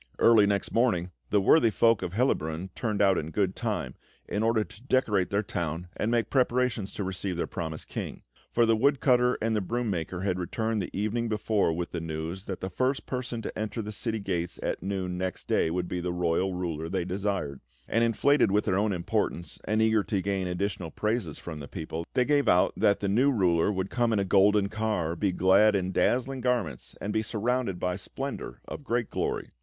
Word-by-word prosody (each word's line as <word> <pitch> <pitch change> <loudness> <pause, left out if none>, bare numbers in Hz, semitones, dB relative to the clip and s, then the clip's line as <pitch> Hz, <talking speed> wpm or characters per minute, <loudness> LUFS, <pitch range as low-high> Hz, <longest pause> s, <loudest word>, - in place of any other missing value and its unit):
Early 110 -3 +6
next 100 -1 0
morning 105 -7 +1 0.2
the 105 - +3
worthy 115 +5 +5
folk 115 0 +3
of 90 -1 -4
Hellabrunn 95 - 0
turned 105 -3 0
out 95 -2 +4
in 75 - -5
good 95 +1 0
time, 105 - -2 0.3
in 105 - -1
order 115 -1 +2
to 105 - -15
decorate 115 -8 +1
their 100 +1 0
town 85 -1 -4
and 105 - -1
make 120 -1 0
preparations 125 -5 +1
to 100 - -3
receive 95 -1 -3
their - - 0
promised 80 -3 -5
King; - - -6 0.3
for 120 - +4
the 115 0 +4
woodcutter 125 0 +3
and 110 0 +1
the 105 - +1
broom 115 +3 -1
maker 90 0 -3
had 95 -2 -1
returned 110 +4 -1
the 90 - -4
evening 110 +3 -1
before 105 -4 +1
with 85 +1 -3
the 85 - -3
news 80 +4 -5
that 95 - -5
the 95 - -3
first 130 +6 0
person 125 -3 -4
to - - -5
enter 110 +1 -3
the 105 -1 -4
city 110 +2 -2
gates 90 -4 -3
at - - -2
noon 95 -2 -3
next 95 -1 -3
day - - +2
would 90 +1 -2
be 90 - -3
the 90 0 -2
royal 90 +2 0
ruler 80 -3 -3
they 95 -1 -1
desired 95 -7 -2 0.3
and, 115 +2 +2
inflated 115 +3 +3
with 105 +2 +2
their 95 -2 +2
own 105 0 +1
importance 85 -1 -2
and 110 +1 +2
eager 110 -1 +3
to 100 -1 -1
gain 95 -1 -1
additional 90 -1 -2
praises 105 -3 -2
from 80 -3 -7
the 70 - -7
people, 80 0 -5
they 125 - +3
gave 145 0 +2
out 90 - +4
that 100 - +2
the 100 - 0
new 125 +8 +3
ruler 90 -5 +2
would 95 -1 -3
come 120 -1 +1
in 110 - +2
a 100 - +1
golden 100 +1 +4
car, 105 -7 -1
be 95 +3 0
clad 95 +4 +5
in 95 -1 0
dazzling 130 +6 +1
garments, 120 - -1
and 105 - -3
be 110 - +2
surrounded 110 -2 -1
by 90 0 0
a - - -4
splendour 135 +8 -6
of 150 - -7
great 120 -3 -1
glory. - - -2
100 Hz, 210 wpm, -28 LUFS, 90-115 Hz, 0.3 s, Early